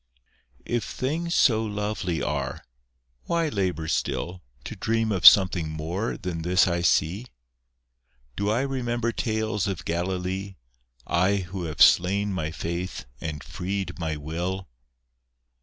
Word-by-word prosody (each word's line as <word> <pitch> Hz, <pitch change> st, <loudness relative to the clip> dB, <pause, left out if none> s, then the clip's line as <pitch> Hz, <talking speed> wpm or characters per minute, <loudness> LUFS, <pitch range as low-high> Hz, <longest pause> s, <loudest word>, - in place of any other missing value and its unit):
If 120 Hz, -1 st, -1 dB
things 165 Hz, +6 st, -2 dB
so 110 Hz, -3 st, +4 dB
lovely 105 Hz, -5 st, -2 dB
are, -, -, -3 dB, 0.6 s
why 165 Hz, -2 st, +1 dB
labour 90 Hz, -, -1 dB
still 90 Hz, +3 st, -2 dB, 0.2 s
To -, -, -6 dB
dream 110 Hz, +2 st, 0 dB
of 95 Hz, -4 st, +6 dB
something 90 Hz, -5 st, +7 dB
more 80 Hz, +8 st, -3 dB
than 90 Hz, -5 st, -4 dB
this 90 Hz, +3 st, +3 dB
I 85 Hz, -1 st, 0 dB
see? 90 Hz, +7 st, +1 dB, 1.1 s
Do 100 Hz, +1 st, -1 dB
I 115 Hz, +4 st, +2 dB
remember 120 Hz, -3 st, -1 dB
tales 110 Hz, -3 st, -1 dB
of 95 Hz, -4 st, -4 dB
Galilee, 95 Hz, +3 st, -2 dB, 0.5 s
I 90 Hz, +4 st, +2 dB
who 95 Hz, -1 st, -4 dB
have 80 Hz, +1 st, +4 dB
slain 100 Hz, +4 st, +4 dB
my 80 Hz, -4 st, -2 dB
faith 85 Hz, -1 st, -4 dB
and 75 Hz, -2 st, -5 dB
freed 95 Hz, +3 st, -4 dB
my 80 Hz, -2 st, -2 dB
will? 90 Hz, +5 st, -4 dB
95 Hz, 125 wpm, -26 LUFS, 85-110 Hz, 1.1 s, something